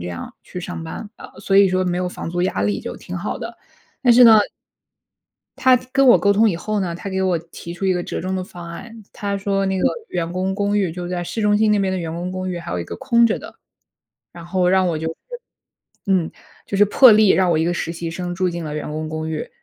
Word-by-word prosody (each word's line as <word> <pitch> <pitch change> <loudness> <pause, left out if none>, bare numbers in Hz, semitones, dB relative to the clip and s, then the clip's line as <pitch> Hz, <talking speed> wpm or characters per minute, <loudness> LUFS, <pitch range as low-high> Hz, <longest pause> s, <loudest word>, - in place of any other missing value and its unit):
这 85 - -6
样 85 -1 -7
去 180 - -7
上 175 -1 -6
班 160 +6 -7
啊， - - -10
呃， - - -13
所 195 - +1
以 200 0 +7
说 185 0 0
没 180 -1 -1
有 180 0 -1
房 180 - -6
租 175 +1 -2
压 180 - -1
力 100 0 0
就 - - -7
挺 180 - -7
好 185 +4 -3
的。 230 0 -7 0.5
但 245 -2 +6
是 245 +2 +7
呢 225 -2 +9 1.2
他 260 -1 +5 0.2
跟 275 +1 +3
我 245 - +8
沟 200 - +3
通 215 +2 +4
以 180 - -1
后 215 +5 -2
呢， 175 -3 -2
他 195 - -6
给 190 0 -2
我 185 -2 +1
提 170 +1 -10
出 185 +3 -4
一 190 - +3
个 180 -1 -2
折 - - -5
中 185 +2 -2
的 185 - -2
方 175 -3 -10
案， 225 +6 -10
他 200 -1 -3
说 195 0 -1
那 190 0 0
个 - - -1 0.3
员 170 -1 -3
工 185 +2 -1
公 205 +1 0
寓 190 -5 0
就 175 +1 -6
在 175 0 -3
市 220 +6 -4
中 210 0 +3
心， 215 0 +3
那 210 - +3
边 195 -1 0
的 190 - -1
员 165 -2 -4
工 175 +2 -4
公 185 0 -4
寓 180 - -3
还 170 - -7
有 90 - -2
一 - - -3
个 85 - -7
空 235 - +3
着 220 - +1
的， - - -11 0.8
然 170 -1 -11
后 180 +1 0
让 185 0 +3
我 165 -3 -1
就 160 +1 -3
是 160 - -3 0.9
嗯， 185 -4 +1 0.3
就 - - -4
是 205 - +6
破 245 +4 +7
例， 215 -1 +5
让 190 -1 +4
我 160 - +2
一 160 - +1
个 175 - 0
实 165 - -3
习 170 0 -5
生 175 +1 -4
住 185 0 0
进 170 -1 -5
了 150 -1 -5
员 150 0 -5
工 155 +1 -4
公 155 0 -4
寓。 155 -1 -4
185 Hz, 290 characters per minute, -20 LUFS, 170-200 Hz, 1.2 s, 呢